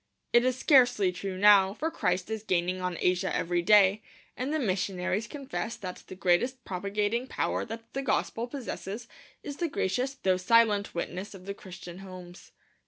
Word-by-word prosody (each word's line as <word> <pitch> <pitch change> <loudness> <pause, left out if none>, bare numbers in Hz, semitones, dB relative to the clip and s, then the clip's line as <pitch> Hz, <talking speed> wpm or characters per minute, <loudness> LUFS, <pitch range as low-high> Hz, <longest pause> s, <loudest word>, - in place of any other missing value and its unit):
It 240 0 +6
is 255 0 +1
scarcely 245 -9 +4
true 185 +1 -5
now, 200 -1 +6
for 320 +7 -2
Christ 180 - -1
is 220 -1 -2
gaining 185 -2 0
on 180 -2 -2
Asia 180 0 +1
every 175 0 0
day; 200 +2 +5 0.3
and 260 +3 -3
the 315 - +1
missionaries 190 -3 -1
confess 275 -5 -5
that 185 -2 -8
the - - -8
greatest 230 +8 +1
propagating 205 +6 -1
power - - -1
that 230 0 -9
the 275 - -2
gospel 240 -3 -1
possesses 235 -4 -6 0.4
is 285 -1 -6
the 340 -2 -1
gracious 255 +3 -1
though 190 -8 +1
silent 210 0 +3
witness 185 +4 -4
of 185 -1 -12
the 200 - -4
Christian 180 -2 -10
homes. 185 -2 -11
200 Hz, 170 wpm, -29 LUFS, 185-240 Hz, 0.4 s, It